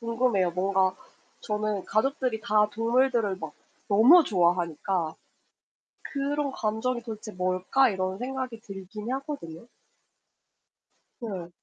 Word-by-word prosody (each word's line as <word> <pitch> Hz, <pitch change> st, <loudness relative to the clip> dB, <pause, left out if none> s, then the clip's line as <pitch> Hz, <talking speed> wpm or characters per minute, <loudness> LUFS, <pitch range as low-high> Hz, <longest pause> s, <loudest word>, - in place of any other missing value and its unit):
궁금해요. 230 Hz, -5 st, +1 dB
뭔가 185 Hz, +1 st, +1 dB, 0.5 s
저는 210 Hz, -2 st, -2 dB
가족들이 255 Hz, 0 st, 0 dB
다 215 Hz, -2 st, +3 dB
동물들을 230 Hz, -2 st, +1 dB
막 160 Hz, -2 st, -6 dB, 0.4 s
너무 255 Hz, -, +7 dB
좋아하니까 175 Hz, -2 st, 0 dB, 0.9 s
'그런 285 Hz, 0 st, -2 dB
감정이 235 Hz, +2 st, -1 dB
도대체 220 Hz, -2 st, -7 dB
뭘까?' 185 Hz, +8 st, +2 dB
이런 190 Hz, -1 st, -2 dB
생각이 255 Hz, -1 st, -4 dB
들기는 210 Hz, +2 st, -7 dB
하거든요. 245 Hz, -, -7 dB, 1.5 s
네. 190 Hz, -7 st, -5 dB
215 Hz, 250 characters per minute, -27 LUFS, 185-250 Hz, 1.5 s, 너무